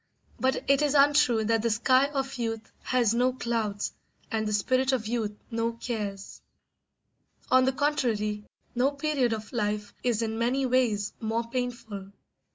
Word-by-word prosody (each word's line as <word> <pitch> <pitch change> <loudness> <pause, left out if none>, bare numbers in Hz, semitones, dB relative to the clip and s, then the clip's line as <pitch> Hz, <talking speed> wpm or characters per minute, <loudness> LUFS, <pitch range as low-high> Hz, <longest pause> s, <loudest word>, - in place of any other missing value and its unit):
But 260 +1 0
it 275 +1 +4
is 295 -1 +2
untrue 275 -6 +4
that 225 0 +2
the 230 - +1
sky 255 +5 +4
of 270 -2 -3
youth 225 -1 -3
has 240 -4 +2
no 250 +2 +2
clouds 225 -5 -2 0.4
and 220 -2 0
the - - -1
spirit 255 +6 +2
of 240 -4 0
youth 215 -2 -2
no 230 0 0
cares; 210 -4 -5 1.1
on 255 0 +6
the 265 - +3
contrary, 235 -7 0 0.3
no 250 +3 +3
period 280 -4 0
of 220 +1 -5
life 210 -2 -2
is 235 -2 +1
in 225 0 -2
many 255 +3 +1
ways 240 -5 +1
more 230 +1 -2
painful. 230 -5 -4
235 Hz, 155 wpm, -28 LUFS, 215-260 Hz, 1.1 s, on